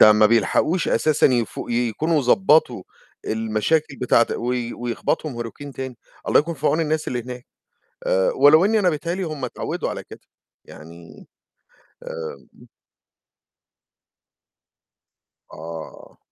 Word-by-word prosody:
ده 110 Hz, -, +9 dB
ما 105 Hz, 0 st, +5 dB
بيلحقوش 115 Hz, -, +1 dB
أساسًا 155 Hz, -1 st, +3 dB
يفو 120 Hz, -4 st, -1 dB
يكونوا 125 Hz, +7 st, 0 dB
ضبّطوا 130 Hz, -, +3 dB, 0.4 s
المشاكل 110 Hz, +7 st, 0 dB
بتاعة 115 Hz, -2 st, +3 dB
وي 120 Hz, 0 st, -2 dB
ويخبطهم 120 Hz, +2 st, -3 dB
hurricane 140 Hz, +5 st, -9 dB
تاني، 130 Hz, -2 st, -6 dB, 0.3 s
الله -, -, +5 dB
يكون 165 Hz, +3 st, -5 dB
في 150 Hz, 0 st, -3 dB
عون 160 Hz, -, +2 dB
الناس 155 Hz, 0 st, -1 dB
اللي 125 Hz, -1 st, -3 dB
هناك، 125 Hz, +1 st, -9 dB, 0.6 s
آآ -, -, +2 dB
ولو 155 Hz, -, +6 dB
إنّي 220 Hz, +2 st, +3 dB
أنا 185 Hz, -4 st, +3 dB
بتهيأ 165 Hz, +2 st, -3 dB
لي 190 Hz, -, -4 dB
هم 155 Hz, -5 st, -5 dB
اتعوّدوا 125 Hz, -, -4 dB
على -, -, -6 dB
كده. -, -, -13 dB, 0.4 s
يعني 85 Hz, +2 st, -14 dB, 0.8 s
آمم 80 Hz, -5 st, -9 dB, 2.9 s
آه. 80 Hz, 0 st, -10 dB
125 Hz, 120 wpm, -22 LUFS, 115-155 Hz, 2.9 s, ده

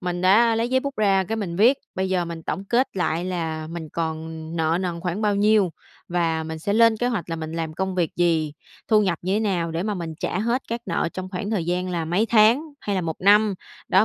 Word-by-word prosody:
mình 175 Hz, -1 st, -3 dB
đã 225 Hz, +5 st, +5 dB
lấy 230 Hz, +1 st, 0 dB
giấy 260 Hz, 0 st, +2 dB
bút 280 Hz, 0 st, -5 dB
ra 195 Hz, -3 st, +3 dB
cái 225 Hz, +5 st, -3 dB
mình 180 Hz, -6 st, -4 dB
viết, 245 Hz, +7 st, +5 dB, 0.2 s
bây 190 Hz, 0 st, -1 dB
giờ 180 Hz, -2 st, +1 dB
mình 165 Hz, -1 st, -7 dB
tổng 195 Hz, +4 st, -4 dB
kết 240 Hz, 0 st, 0 dB
lại 175 Hz, -1 st, 0 dB
là 160 Hz, -4 st, -3 dB
mình 165 Hz, -1 st, -6 dB
còn 160 Hz, 0 st, -3 dB, 0.3 s
nợ 160 Hz, +1 st, +1 dB
nần 175 Hz, -2 st, -3 dB
khoảng 180 Hz, +3 st, -3 dB
bao 205 Hz, -1 st, +2 dB
nhiêu 205 Hz, -3 st, +3 dB, 0.4 s
và 165 Hz, -2 st, 0 dB
mình 160 Hz, 0 st, -5 dB
sẽ 200 Hz, +6 st, -2 dB
lên 230 Hz, 0 st, +5 dB
kế 245 Hz, -, -1 dB
hoạch 200 Hz, -8 st, -3 dB
là 165 Hz, -, -2 dB
mình 160 Hz, 0 st, -5 dB
làm 160 Hz, -1 st, -3 dB
công 190 Hz, +1 st, -2 dB
việc 175 Hz, -3 st, -1 dB
gì, 165 Hz, -4 st, +1 dB, 0.4 s
thu 215 Hz, -2 st, +5 dB
nhập 175 Hz, -4 st, 0 dB
như 190 Hz, +2 st, 0 dB
thế -, -, +1 dB
nào 180 Hz, -6 st, 0 dB
để 165 Hz, +2 st, -2 dB
mà 210 Hz, 0 st, -1 dB
mình 165 Hz, -3 st, -5 dB
trả 180 Hz, -, -1 dB
hết 235 Hz, +5 st, 0 dB
các 235 Hz, +1 st, -3 dB
nợ 170 Hz, -, 0 dB
trong 185 Hz, 0 st, -5 dB
khoảng 200 Hz, +2 st, -4 dB
thời 195 Hz, -7 st, 0 dB
gian 180 Hz, +1 st, -1 dB
là 170 Hz, -2 st, -2 dB
mấy 180 Hz, +8 st, +1 dB
tháng 225 Hz, +5 st, +5 dB, 0.2 s
hay 205 Hz, -, -2 dB
là -, -, +1 dB
1 165 Hz, -2 st, -3 dB
năm. 205 Hz, +1 st, +5 dB, 0.3 s
Đó, 190 Hz, +3 st, +5 dB
185 Hz, 250 wpm, -23 LUFS, 165-210 Hz, 0.4 s, đã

